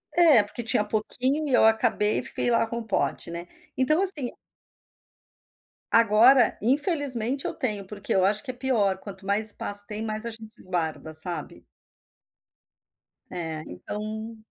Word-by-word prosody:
É, 320 -10 +6
porque 205 +4 -7
tinha 220 -2 +2
pouquinho 255 +8 -1
e 270 - -1
eu 245 - +5
acabei 220 -1 +2
e - - -1
fiquei - - -1
lá 230 -1 +2
com 235 +1 -6
o - - -6
pote, 195 - -1
né? 170 +1 -7 0.3
Então, 305 +7 +2
assim 315 -10 +3 1.6
Agora, 230 +4 +5
infelizmente, 270 - 0
eu - - -2
tenho, 215 -9 -3
porque 200 0 -4
eu 190 -1 +3
acho 210 +2 0
que 260 - -5
é - - -15
pior. 235 -7 0
Quanto 195 0 -11
mais 205 +2 +3
espaço 205 -1 +1
tem, 215 +1 -5
mais 215 +1 -4
a - - -3
gente 220 -1 -10
guarda, 160 -3 -4
sabe? 170 +3 -2 1.6
É, 160 -3 -5
então 215 - -7
220 Hz, 155 wpm, -25 LUFS, 200-255 Hz, 1.6 s, É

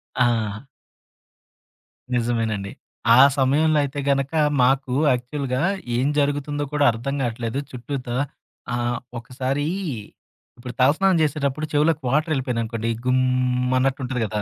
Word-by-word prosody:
ఆ! 115 -1 0 1.5
నిజమేనండి. 115 -4 -1 0.4
ఆ - - +5 0.2
సమయంలో 150 +4 +3
అయితే 140 +1 -4
గనక, 135 +1 +1 0.3
మాకు 130 0 +2 0.2
యాక్చువల్‌గా 130 +1 -2 0.4
ఏం 130 +3 +1
జరుగుతుందో 145 0 -1
కూడా 145 -1 +3
అర్థం 120 +5 -4
కావట్లేదు, 120 +1 -2
చుట్టూ 130 +3 -5
త - - -5 0.7
ఆహ్, 120 0 -1 0.2
ఒకసారి 130 +4 -3 0.9
ఇప్పుడు 125 +1 -8
తలస్నానం 170 +7 +4
చేసేటప్పుడు 150 0 -1
చెవులోకి 150 +1 +2
వాటరెళ్ళిపోయందనుకోండి. 125 -6 -1 0.2
గుమ్, 125 0 +1
అన్నట్టుంటది 130 -2 -1
కదా! 105 0 -3
130 Hz, 105 wpm, -23 LUFS, 120-145 Hz, 1.5 s, ఆ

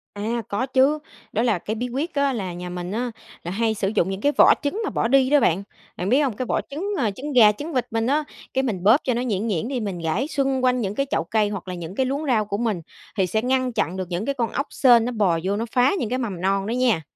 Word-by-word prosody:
À, 225 +4 -2
có 205 +6 -1
chứ. 270 +3 +3 0.3
Đó 220 - +1
là 220 -7 +2
cái 215 +5 -4
bí 245 +3 -3
quyết 285 +7 -3
á 280 -1 +1
là 190 -6 -4
nhà 180 +1 -6
mình 180 0 -5
á 240 +3 -2 0.3
là 175 - -4
hay 220 +3 +1
sử 195 -2 -2
dụng 190 -2 +2
những 195 +1 -4
cái 290 - +3
vỏ - - +8
trứng 300 +10 -2
mà - - -1
bỏ - - 0
đi 265 +1 +4
đó 295 +1 +5
bạn. 185 -5 +2 0.3
Bạn 180 +3 -2
biết 260 - +4
hông? 250 -7 -1
Cái 255 - -3
vỏ - - 0
trứng, 370 +9 -3
à, 225 -7 +1
trứng 280 +7 -6
gà 220 -4 +7
trứng 295 +10 -7
vịt 255 - +1
mình 225 0 0
á, 295 +3 +2 0.3
cái 265 - +1
mình 200 -8 -2
bóp 220 +7 +7
cho 255 - 0
nó 240 - -1
nhuyễn 220 -3 -1
nhuyễn 195 0 -1
đi, 260 -1 -2
mình 200 -6 -4
rải 165 - -1
xung 270 -3 0
quanh 250 -1 +2
những 200 -1 -2
cái 275 - 0
chậu - - +1
cây 210 +3 +1
hoặc 195 -3 -6
là 185 - -4
những 175 +1 -7
cái 265 - +1
luống 280 +4 -2
rau 230 -6 +2
của 200 -1 -3
mình, 215 -6 -1 0.4
thì 190 -2 +2
sẽ 220 +4 0
ngăn 255 0 0
chặn 185 -2 -1
được 185 -1 -4
những 175 +4 -2
cái 280 +1 -1
con 235 -3 -1
ốc 280 - -2
sên 240 -4 +5
nó 250 - -1
bò 195 -7 +1
vô 195 +2 0
nó 225 +3 -2
phá 250 +1 +4
những 225 - -2
cái 255 - 0
mầm 200 -8 -4
non 195 +1 0
đó 225 - -2
nha. 245 -8 +2
230 Hz, 295 wpm, -23 LUFS, 195-260 Hz, 0.4 s, vỏ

